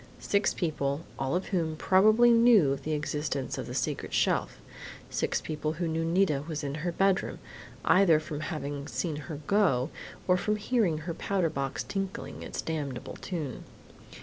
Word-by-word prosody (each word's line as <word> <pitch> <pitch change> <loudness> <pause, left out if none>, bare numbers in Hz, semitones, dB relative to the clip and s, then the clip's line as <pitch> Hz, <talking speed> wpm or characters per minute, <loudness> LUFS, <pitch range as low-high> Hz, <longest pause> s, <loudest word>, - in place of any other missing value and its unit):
Six 200 0 +1
people, 145 -4 -1 0.2
all 135 +4 0
of 185 - -2
whom 165 -5 0
probably 215 +8 +5
knew 230 - +6
of 140 - -2
the 155 - -2
existence 150 -2 -2
of - - -5
the - - -6
secret - - -2
shelf.... - - +1 0.5
Six - - 0
people 155 0 -3
who 170 +1 -2
knew 160 0 -1
Nita 165 -4 +2
was 155 -2 -4
in 140 -1 -3
her 175 +1 -1
bedroom, 195 +2 +1 0.5
either 180 -5 +5
from 155 -1 -6
having 145 -3 -4
seen 165 -4 -2
her 150 0 -7
go 170 -10 +2 0.4
or 180 0 +5
from 210 +3 0
hearing 210 -6 +1
her 170 - -2
powder 180 -2 0
box 135 -1 -2
tinkling 195 -1 -4
its - - -5
damnable 145 -6 -4
tune!... 155 -9 -5
160 Hz, 165 wpm, -29 LUFS, 145-190 Hz, 0.5 s, knew